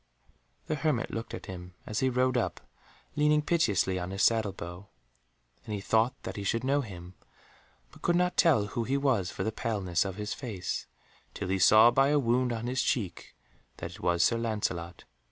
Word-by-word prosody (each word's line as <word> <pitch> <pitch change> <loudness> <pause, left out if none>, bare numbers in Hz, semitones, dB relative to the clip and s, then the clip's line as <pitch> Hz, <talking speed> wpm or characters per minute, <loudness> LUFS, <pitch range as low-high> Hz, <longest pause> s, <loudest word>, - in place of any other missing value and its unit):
The - - -2
hermit 150 -5 0
looked 115 0 -5
at - - -9
him 90 -1 -9
as 105 - -2
he 130 - +2
rode 130 +1 +1
up, 120 - -1 0.6
leaning 150 0 +3
piteously 100 - +1
on 90 0 -4
his 95 +1 -1
saddle 110 -3 +3
bow, 90 +1 -9 0.8
and 105 - -4
he - - -3
thought 110 +5 +2
that - - -6
he 100 - -4
should 115 +4 0
know 140 +2 +2
him, 90 -6 -9 0.8
but - - -17
could 175 - +2
not 180 0 +2
tell 150 - +4
who 110 +3 -3
he 135 +4 0
was 130 -10 +1
for - - -4
the 110 - -1
paleness 100 -7 -1
of 95 -2 -5
his 105 0 -4
face, 110 -9 -4 0.5
till - - -4
he 95 0 +1
saw 110 +5 +7
by 135 +2 +4
a 150 +1 +3
wound 125 -1 +2
on 115 0 -3
his 125 +2 0
cheek 95 -9 -2 0.4
that - - -6
it - - -12
was 85 -1 +2
Sir 115 - +2
Lancelot. 90 -7 -3
110 Hz, 195 wpm, -29 LUFS, 95-130 Hz, 0.8 s, saw